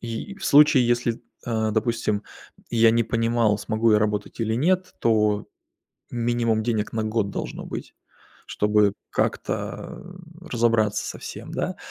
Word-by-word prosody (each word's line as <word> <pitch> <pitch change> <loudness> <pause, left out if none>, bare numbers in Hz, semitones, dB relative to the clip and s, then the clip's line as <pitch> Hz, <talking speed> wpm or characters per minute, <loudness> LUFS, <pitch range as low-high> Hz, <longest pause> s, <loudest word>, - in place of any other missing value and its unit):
и 120 - -5
в 195 - -9
случае, 145 -3 +6
если, 120 -1 0 0.2
э, 110 -2 0
допустим, 110 -1 0 0.5
я 115 -1 +5
не 115 +1 +3
понимал, 115 -2 +1
смогу 110 +2 +1
я 105 - +5
работать 105 +1 -2
или 110 0 0
нет, 185 +8 +1
то 105 -2 +2 0.6
минимум 115 -2 0
денег 110 -2 -1
на 110 -1 -1
год 110 -2 0
должно - - -5
быть, - - -7 0.5
чтобы 105 -1 +2 0.2
как-то, - - -3 0.4
э, 175 - -13
разобраться 115 -3 +2
со - - -6
всем, - - -8
да. - - -2
115 Hz, 140 wpm, -24 LUFS, 105-120 Hz, 0.6 s, случае